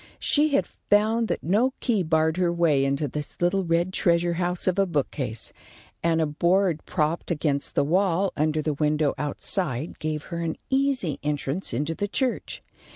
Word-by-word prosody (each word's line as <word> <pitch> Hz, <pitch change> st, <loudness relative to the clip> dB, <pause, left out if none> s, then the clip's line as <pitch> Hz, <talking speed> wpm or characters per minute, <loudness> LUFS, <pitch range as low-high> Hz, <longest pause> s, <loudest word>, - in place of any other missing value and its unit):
She 295 Hz, -1 st, +3 dB
had -, -, +2 dB
found 220 Hz, +2 st, +1 dB
that -, -, -3 dB
no 225 Hz, -, +2 dB
key 225 Hz, -6 st, +1 dB
barred 160 Hz, 0 st, +1 dB
her 180 Hz, -2 st, +2 dB
way 165 Hz, -5 st, +2 dB
into 140 Hz, +2 st, 0 dB
this 150 Hz, +2 st, -6 dB
little 180 Hz, +2 st, +1 dB
red 170 Hz, +2 st, 0 dB
treasure 170 Hz, -1 st, +2 dB
house 175 Hz, +1 st, -1 dB
of 185 Hz, +1 st, +1 dB
a 195 Hz, -, +3 dB
bookcase, 135 Hz, -, -2 dB, 0.5 s
and 165 Hz, -1 st, +2 dB
a 160 Hz, -, +3 dB
board 170 Hz, +2 st, +1 dB
propped 160 Hz, -1 st, -1 dB
against 150 Hz, -4 st, -1 dB
the -, -, +3 dB
wall 185 Hz, +4 st, +1 dB
under 155 Hz, 0 st, 0 dB
the 155 Hz, -, 0 dB
window 150 Hz, 0 st, +1 dB
outside 150 Hz, -1 st, -2 dB
gave 155 Hz, -1 st, -3 dB
her 170 Hz, -, -2 dB
an 165 Hz, -1 st, -2 dB
easy 265 Hz, -, +1 dB
entrance 145 Hz, +4 st, -2 dB
into 145 Hz, +7 st, -1 dB
the 205 Hz, +5 st, -2 dB
church. 255 Hz, +4 st, -2 dB
170 Hz, 170 wpm, -25 LUFS, 150-190 Hz, 0.5 s, She